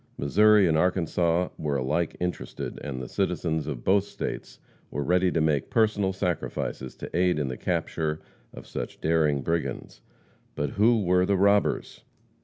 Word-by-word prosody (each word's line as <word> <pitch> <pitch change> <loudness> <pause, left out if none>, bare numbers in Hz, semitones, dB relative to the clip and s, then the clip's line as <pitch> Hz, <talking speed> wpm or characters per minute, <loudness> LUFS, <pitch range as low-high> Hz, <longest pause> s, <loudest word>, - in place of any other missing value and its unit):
Missouri 105 +7 +5
and 80 - +2
Arkansas 90 0 +1
were 75 -2 -1
alike 75 +6 -1
interested, 90 0 -4
and 70 -3 -4
the 65 - -6
citizens 80 +1 -1
of 70 -6 -5
both 95 +1 +3
states - - -6 0.3
were 75 - -3
ready 90 +3 +2
to 85 - 0
make 75 -3 +1
personal 105 -4 +2
sacrifices 90 -8 -3
to - - -8
aid 90 -1 +2
in 70 -3 -1
the 65 - -4
capture 75 +3 -2 0.3
of - - -11
such - - -6
daring 75 -4 +1
brigands. 85 +4 -3 0.5
But 75 - -2
who 110 +1 +3
were 90 0 +3
the 100 - +2
robbers? 100 +2 +1
85 Hz, 155 wpm, -26 LUFS, 75-95 Hz, 0.5 s, Missouri